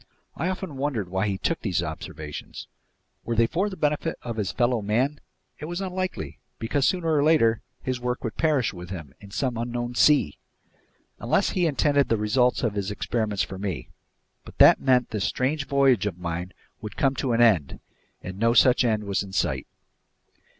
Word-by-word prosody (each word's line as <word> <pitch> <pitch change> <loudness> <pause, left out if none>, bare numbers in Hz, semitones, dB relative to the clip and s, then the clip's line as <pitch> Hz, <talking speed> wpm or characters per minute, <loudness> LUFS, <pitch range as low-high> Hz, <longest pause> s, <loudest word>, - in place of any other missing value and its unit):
I 170 +5 -1
often 185 -6 -5
wondered 130 -9 -2
why 95 +3 0
he 100 -2 -1
took - - -1
these - - 0
observations. 75 -1 -7 0.6
Were 120 - -2
they 115 +1 +4
for 185 - -1
the 190 - -8
benefit 150 +2 -1
of 115 -2 -5
his 100 -4 -1
fellow 120 -2 +1
man? 125 +8 0 0.4
It 150 - -6
was 175 +3 -4
unlikely, 185 - -4 0.2
because 135 +4 0
sooner 165 -3 +1
or 145 - +3
later 115 -8 +3 0.2
his 130 -1 -2
work 125 0 -3
would 110 -4 -4
perish 145 -9 +1
with 90 -1 -9
him 85 -8 -7
in 100 - -13
some 120 +4 -2
unknown 120 +1 -3
sea! 135 - +3 0.8
Unless - - +1
he 180 -2 +1
intended 145 -1 +2
the 115 - +2
results 125 +4 +2
of 115 -4 +1
his 100 -1 -2
experiments 105 -1 -1
for 95 - -7
me. 95 -5 -4 0.5
But - - -14
that - - +7
meant 125 -2 +2
this 105 -3 -1
strange 145 +3 -1
voyage 135 -7 +3
of 90 -4 -4
mine 90 +1 -4 0.3
would 105 -1 -8
come 135 -1 +2
to 125 -2 0
an 115 - +1
end, 95 - +3 0.4
and 90 +1 -7
no 115 +1 +3
such 125 +2 +5
end 110 -3 +1
was 100 -1 -1
in 95 -1 -8
sight. - - -1
120 Hz, 185 wpm, -25 LUFS, 100-140 Hz, 0.8 s, that